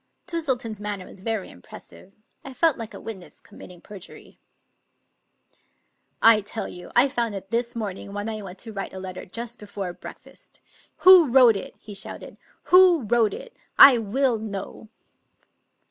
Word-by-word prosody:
Twistleton's 250 - -3
manner 205 -3 -5
was 185 - -14
very 220 -2 -3
impressive. 85 - -14 0.3
I 270 -1 -10
felt 325 +1 +3
like 225 -3 -8
a - - -9
witness 195 -6 -10
committing 180 -1 -14
perjury. 200 -3 -12 1.1
" - - -40
I 215 - 0
tell 205 +2 -6
you, 180 0 -11
I 245 +3 +5
found 235 -6 -2
it 195 0 -9
this 235 +1 -1
morning 200 -3 -6
when 205 +1 -5
I 215 -1 -5
went 190 -1 -10
to 225 -2 -9
write 195 -1 -6
a 190 - -7
letter 185 -1 -8
just 235 +5 -7
before 200 -3 -6
breakfast. - - -13 0.5
Who 365 -4 +9
wrote 245 -3 +6
it?" 195 - -8
he 210 - -12
shouted. 200 - -4 0.3
"Who 360 -5 +7
wrote 220 -1 +1
it? - - -12 0.2
I 265 -4 +9
will 230 +2 0
know." 210 0 -8
220 Hz, 160 wpm, -24 LUFS, 195-245 Hz, 1.1 s, Who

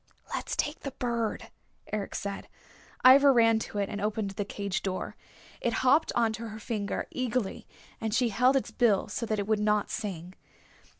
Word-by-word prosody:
"Let's - - -3
take 295 +2 -1
the 275 - -5
bird," 235 -3 -2 0.4
Eric 210 -2 -3
said. 200 -1 -4 0.6
Ivra 275 +2 +9
ran 230 -3 +5
to 215 - -6
it, 200 -1 0
and 205 0 -5
opened 210 -1 -1
the 200 +1 -3
cage 200 -1 -3
door. 185 -1 -3 0.5
It 235 - 0
hopped 285 +5 +4
onto 230 0 0
her 215 0 -7
finger 210 -2 -3
eagerly, 250 -4 -2 0.3
and 220 -1 -1
she 235 +2 +2
held 250 +5 +3
its 270 - 0
bill 215 -4 +2
so 230 +2 -3
that 215 - 0
it 200 - -1
would 215 0 +1
not 210 -1 +1
sing. 185 -4 -5
220 Hz, 175 wpm, -29 LUFS, 205-240 Hz, 0.6 s, Ivra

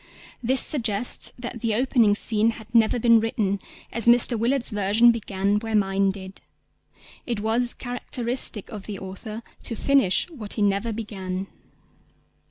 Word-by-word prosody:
This 255 +2 +3
suggests 235 -5 +2
that 240 -2 -7
the 225 -3 0
opening 235 -4 +2
scene 220 +1 +1
had 225 +1 -14
never 225 0 +3
been 230 -1 +4
written, 210 -3 -1 0.3
as 230 0 -1
Mr. 240 +1 +6
Willard's 240 +3 +1
version 210 +3 +4
began 205 -2 -1
where 225 0 -4
mine 195 -1 +1
did. 190 0 -8 0.9
It 235 -4 -2
was 230 +3 +1
characteristic 245 -3 -2
of 210 -4 -9
the 205 -2 -5
author 195 +4 -8 0.2
to 230 - -4
finish 265 -6 +2
what 220 -10 -7
he 210 - -1
never 200 +3 0
began. 195 -4 -5
220 Hz, 145 wpm, -24 LUFS, 200-235 Hz, 0.9 s, Mr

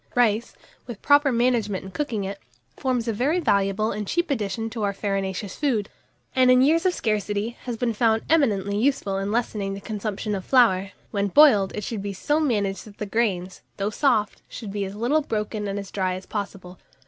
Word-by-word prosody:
RICE, 235 -2 +2 0.3
with 235 -5 -7
proper 285 -1 +5
management 230 -5 +1
in 190 - -8
cooking 235 -5 -2
it, 195 +1 -5 0.4
forms 250 -3 -1
a 225 - 0
very 280 - +1
valuable 200 - +1
and 210 0 -4
cheap 345 - 0
addition 225 -2 -2
to 225 -1 -5
our 200 -1 0
farinaceous 195 -1 -3
food, 235 -9 0 0.5
and, 255 -1 +5
in 255 0 +6
years 330 +6 +3
of 360 - +1
scarcity, 210 -1 -1 0.2
has 240 -2 -3
been 235 0 0
found 225 0 +2
eminently 205 -11 +2
useful 215 -6 +1
in 195 +1 -2
lessening 210 -4 -1
the - - -7
consumption 210 0 -4
of 190 -2 -3
flour. 200 -7 +4 0.2
When 200 -1 0
boiled, 205 -5 +6
it 210 - -4
should 215 0 -4
be 200 0 -4
so 295 +10 0
managed 205 -10 0
that 205 -2 -14
the 210 - -3
grains, 195 -4 -1 0.2
though 200 +1 -1
soft, 215 -4 +1
should 215 -4 -7
be 200 0 -2
as 195 +1 -7
little 245 +8 +1
broken 210 -4 -3
and 200 0 -3
as 200 -1 -6
dry 185 -2 -1
as 185 0 -8
possible. 195 -3 -6
210 Hz, 195 wpm, -24 LUFS, 200-245 Hz, 0.5 s, in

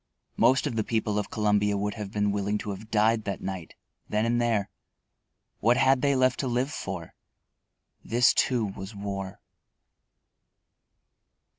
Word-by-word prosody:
Most 130 0 +4
of 140 -6 -2
the 110 - +1
people 105 -2 0
of 105 - -4
Columbia 105 -1 +1
would 105 +1 -1
have 105 -3 -6
been 105 -1 +1
willing 100 +1 -1
to 105 0 -5
have 105 +3 -8
died 110 +1 +2
that 100 -2 -3
night, 95 -3 -6 0.3
then 105 +1 +1
and 120 +1 +1
there. 115 -4 0 0.9
What 120 +3 +3
had 135 -1 +4
they 140 -1 +2
left 130 0 +2
to 135 - -1
live 125 +3 0
for? 95 - -6 0.9
_This, 120 +2 +4
too, 120 -4 +2
was 95 +1 -7
war. 100 -1 -5
105 Hz, 150 wpm, -27 LUFS, 100-120 Hz, 0.9 s, Most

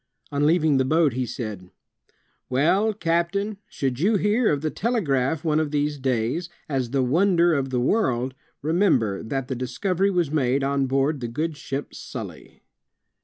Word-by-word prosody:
On 145 +1 +2
leaving 155 -3 +3
the 130 - +3
boat 155 0 +2
he 125 0 -2
said, 105 -7 -6 0.8
"Well, 170 +12 +3
captain, 195 +2 -1
should 130 -2 -2
you 205 +7 +3
hear 210 +4 +2
of 145 -2 0
the 155 -1 -1
telegraph 160 - 0
one 155 -2 +2
of 155 -2 0
these 145 0 -1
days, 130 +6 -1 0.2
as 130 -5 -1
the 135 +1 +1
wonder 170 +5 +3
of 135 -3 0
the 125 -1 0
world, 130 - +1 0.3
remember 155 - +2
that 130 +3 -3
the 135 - -2
discovery 160 +11 0
was 175 -6 0
made 135 -2 +1
on 140 0 +1
board 135 +3 +1
the 120 - -3
good 155 +7 -3
ship 140 0 -5
StMy.'' - - -9
145 Hz, 165 wpm, -24 LUFS, 130-170 Hz, 0.8 s, leaving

